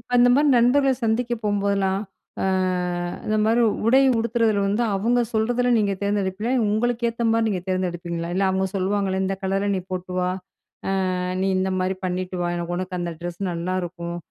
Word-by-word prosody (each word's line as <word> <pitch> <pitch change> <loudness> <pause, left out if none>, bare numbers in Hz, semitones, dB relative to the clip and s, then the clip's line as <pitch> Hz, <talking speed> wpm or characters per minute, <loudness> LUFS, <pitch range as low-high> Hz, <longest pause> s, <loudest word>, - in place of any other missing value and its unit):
அந்த 245 0 +6
மாரி 295 +2 +3
நண்பர்கள 265 +3 +4
சந்திக்க 230 +2 +1
போம்போதெல்லாம், 200 -2 +1 0.4
ஆ - - 0 0.8
இந்த 215 0 +1
மாரி 230 +2 +3 0.2
உடை 260 +4 +5 0.2
உடுத்துறதுல 225 -3 +1
வந்து 210 +4 +1
அவங்க 235 +5 +2
சொல்றதுல 245 +3 +1
நீங்க 205 -2 +1
தேர்ந்தெடுப்பீங்களா? 200 +3 -1 0.2
உங்களுக்கு 235 +2 0
ஏத்த 230 0 -3
மாதிரி 225 0 +2
நீங்க 185 -4 -2
தேர்ந்தெடுப்பீங்களா? 175 -2 -2
இல்ல 195 - +1
அவங்க 190 0 0
சொல்லுவாங்களே 190 0 0
"இந்த 190 0 -1
கலர்ல 195 +1 0
நீ 185 - -2
போட்டு 185 0 -4
வா. 180 0 +1 0.9
அ - - -2 0.3
நீ 195 - +1
இந்த 190 0 0
மாரி 185 +1 -1
பண்ணிட்டு 185 0 -3
வா. 175 - 0
எனக்கு 175 0 -3
உனக்கு 185 0 -4
அந்த 175 -1 -3
ட்ரெஸ் 175 +1 -6
நல்லாயிருக்கும். 175 0 -3
195 Hz, 165 wpm, -23 LUFS, 185-225 Hz, 0.9 s, அந்த